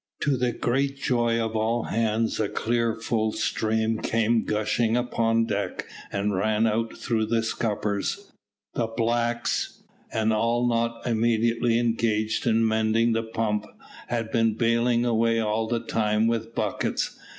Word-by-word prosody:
To 145 -2 +2
the 125 -1 0
great 135 +4 -1
joy 120 -3 +1
of 110 -1 -2
all 115 +2 +1
hands 110 0 0
a 105 -2 0
clear 115 -1 0
full 110 -1 -1
stream 110 0 0
came 115 0 +1
gushing 110 +2 +1
upon 115 -2 +1
deck, 100 -2 -3 0.3
and 100 +1 -1
ran 110 +3 +1
out 115 +1 -1
through 110 -2 -1
the 115 0 +1
scuppers. 110 - -2 0.4
The 115 - 0
blacks, 120 +1 -1 0.3
and 110 0 +1
all 115 +2 +1
not 115 0 -1
immediately 115 0 +2
engaged 115 -2 0
in 115 0 +3
mending 110 +1 +2
the 115 - +1
pump, 110 -2 -2 0.4
had 115 -2 -2
been 115 -2 +2
baling 115 +1 +2
away 115 -1 +2
all 110 0 0
the 120 0 0
time 110 -1 +1
with 115 0 -1
buckets. - - -1
115 Hz, 140 wpm, -25 LUFS, 110-115 Hz, 0.4 s, in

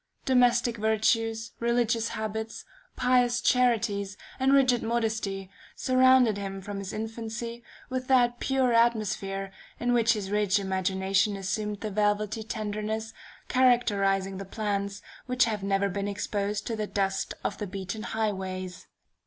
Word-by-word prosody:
Domestic 245 -2 +3
virtues, 225 +1 +1
religious 235 -1 +1
habits, 220 0 -4 0.3
pious 245 -1 +3
charities, 210 -6 +1 0.2
and 265 +1 +3
rigid 260 -3 +4
modesty, 220 -4 -2 0.2
surrounded 255 -4 +4
him 195 -1 -5
from 200 +1 -6
his 195 -1 -5
infancy 225 +2 -5 0.2
with 255 0 -4
that 245 -2 +3
pure 265 -2 +1
atmosphere 205 -4 +1 0.3
in 245 0 +1
which 235 -1 +4
his 200 -3 -4
rich 210 -1 +2
imagination 190 +1 0
assumed 205 +2 -3
the 215 - -3
velvety 210 +1 0
tenderness 215 0 -4 0.3
characterizing 200 -7 +2
the - - -4
plants 200 0 -3 0.2
which 250 0 +3
have 215 -3 -2
never 195 0 +1
been 200 +1 -3
exposed 205 0 -2
to 230 - -2
the 215 -1 -3
dust 195 -1 -1
of - - -3
the 210 - -3
beaten 195 +3 -5
highways. 190 -5 -3
215 Hz, 130 wpm, -28 LUFS, 200-235 Hz, 0.3 s, rigid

